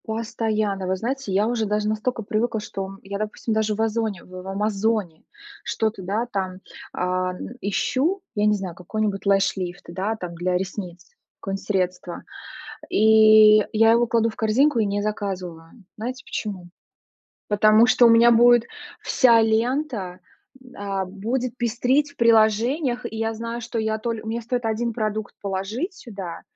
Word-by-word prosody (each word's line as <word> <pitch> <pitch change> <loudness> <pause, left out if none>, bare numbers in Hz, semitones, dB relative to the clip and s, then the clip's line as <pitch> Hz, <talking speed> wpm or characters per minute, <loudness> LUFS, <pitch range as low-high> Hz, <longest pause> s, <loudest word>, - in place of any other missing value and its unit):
Постоянно. 215 -3 -2
Вы 190 - +1
знаете, 245 +2 -4
я 200 +3 +2
уже 230 -2 0
даже 210 0 0
настолько 220 +2 -2
привыкла, 220 +2 -1
что 195 -2 -6
я, 200 +1 -5
допустим, 215 +1 -3
даже 215 -1 0
в 220 - -2
"Озоне" 220 -4 -1
в 185 +1 -10
"Амазоне" 205 -3 -1 0.4
что-то, 220 -3 -2
да, 205 +6 -1
там, 185 -2 -3 0.4
ам, 185 0 -1 0.2
ищу, 270 - 0
я 210 0 +1
не 210 - +3
знаю, 190 -3 -5
какой 180 +5 -5
нибудь 200 -2 -2
lash 195 0 +3
lift, 180 -1 -5
да, 195 +5 -2
там 180 -5 -7
для 180 +1 -1
ресниц, 180 -2 -6 0.3
какое-нибудь 195 0 -5
средство, 185 -3 -2 0.7
и 215 0 +7 0.2
я 225 +1 +6
его 235 +1 +3
кладу 230 0 +2
в 220 - -11
корзинку 235 +5 +2
и 220 - +2
не 200 0 -1
заказываю. 190 -3 -5
Знаете 250 +4 -5
почему? 190 -5 -5 0.8
Потому 215 +2 +5
что 245 - +5
у - - +7
меня 230 +1 +6
будет 240 0 +6 0.4
вся 235 -3 +4
лента, 225 -4 -1 0.6
а, 195 -1 -3
будет 230 +6 -3
пестрить 250 +5 +1
в - - -26
приложениях, 235 +4 +2
и 220 - -5
я 225 0 -1
знаю, 230 +1 -5
что 235 0 -4
я 220 0 -1
толь 225 0 -3
у 220 - -10
меня 230 +2 -2
стоит 245 +1 -3
1 225 +1 -1
продукт 215 -1 -3
положить 205 - -3
сюда, 195 - -8
215 Hz, 160 wpm, -23 LUFS, 195-230 Hz, 0.8 s, и